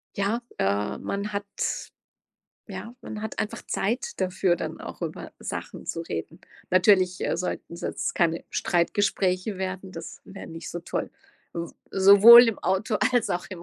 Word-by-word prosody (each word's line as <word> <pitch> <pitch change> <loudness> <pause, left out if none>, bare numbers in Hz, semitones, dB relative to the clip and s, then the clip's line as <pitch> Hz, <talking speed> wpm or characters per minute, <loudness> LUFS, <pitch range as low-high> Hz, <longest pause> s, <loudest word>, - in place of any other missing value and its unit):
Ja, 205 +4 0 0.2
äh, 100 +1 0
man 200 +1 -4
hat 200 0 -2 1.2
ja, 235 - -7
man 215 -1 -7
hat 220 - -6
einfach 210 - -3
Zeit 250 - -2
dafür, 185 -1 +1
dann - - -5
auch - - -9
über - - -5
Sachen - - -6
zu 165 - -3
reden. 80 - -6 0.3
Natürlich, 185 0 +4
äh, - - 0
sollten's 170 0 -5
jetzt - - -2
keine 165 -1 +1
Streitgespräche 185 +2 0
werden, 190 0 -4
das 165 -1 -9
wäre 195 - -10
nicht 165 0 -8
so 175 - -5
toll, - - -4 0.4
s 170 0 -5 0.2
sowohl 200 +5 +10
im 225 - -2
Auto 190 +4 0 0.2
als 245 -3 +2
auch 175 - -2
im 180 -3 -8
190 Hz, 155 wpm, -26 LUFS, 175-205 Hz, 1.2 s, sowohl